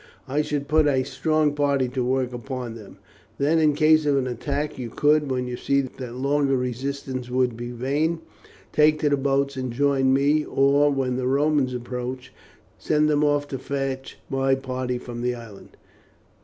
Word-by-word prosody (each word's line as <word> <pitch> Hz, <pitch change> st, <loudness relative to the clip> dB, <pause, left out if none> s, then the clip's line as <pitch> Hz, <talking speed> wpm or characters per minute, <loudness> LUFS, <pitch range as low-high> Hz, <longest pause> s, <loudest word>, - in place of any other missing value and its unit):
I 145 Hz, +3 st, +1 dB
should 145 Hz, -2 st, -3 dB
put 155 Hz, -1 st, +3 dB
a 135 Hz, -2 st, +2 dB
strong 155 Hz, +1 st, +1 dB
party 140 Hz, -3 st, +1 dB
to 125 Hz, 0 st, -2 dB
work 130 Hz, 0 st, 0 dB
upon 125 Hz, -1 st, -5 dB
them. 110 Hz, -3 st, -12 dB, 0.4 s
Then, 150 Hz, +4 st, +2 dB
in 150 Hz, -2 st, +3 dB
case 155 Hz, 0 st, +4 dB
of 140 Hz, -1 st, +3 dB
an 135 Hz, -, +1 dB
attack, 140 Hz, +4 st, -3 dB
you 120 Hz, -2 st, -4 dB
could, 150 Hz, +3 st, +2 dB
when 125 Hz, -1 st, -1 dB
you 125 Hz, 0 st, -4 dB
see 140 Hz, +3 st, +1 dB
that 125 Hz, -2 st, -7 dB
longer 140 Hz, +1 st, +1 dB
resistance 130 Hz, 0 st, -4 dB
would 125 Hz, -1 st, +1 dB
be 120 Hz, +1 st, -6 dB
vain, 140 Hz, +7 st, -1 dB, 0.6 s
take 155 Hz, 0 st, +4 dB
to 150 Hz, -, +3 dB
the 145 Hz, -, +3 dB
boats 140 Hz, 0 st, 0 dB
and 130 Hz, -1 st, -3 dB
join 135 Hz, +1 st, +2 dB
me; 145 Hz, +3 st, +3 dB
or, 140 Hz, +1 st, +3 dB
when 130 Hz, -3 st, -1 dB
the 130 Hz, -1 st, -1 dB
Romans 140 Hz, -1 st, +2 dB
approach, 125 Hz, +1 st, -5 dB, 0.5 s
send 150 Hz, 0 st, +2 dB
them 150 Hz, 0 st, +2 dB
off 145 Hz, -1 st, +1 dB
to 135 Hz, -, -4 dB
fetch 135 Hz, -1 st, -4 dB
my 135 Hz, 0 st, +1 dB
party 130 Hz, -1 st, -3 dB
from 120 Hz, -1 st, -7 dB
the 125 Hz, 0 st, 0 dB
island. 115 Hz, -4 st, -12 dB
135 Hz, 180 wpm, -24 LUFS, 125-145 Hz, 0.6 s, case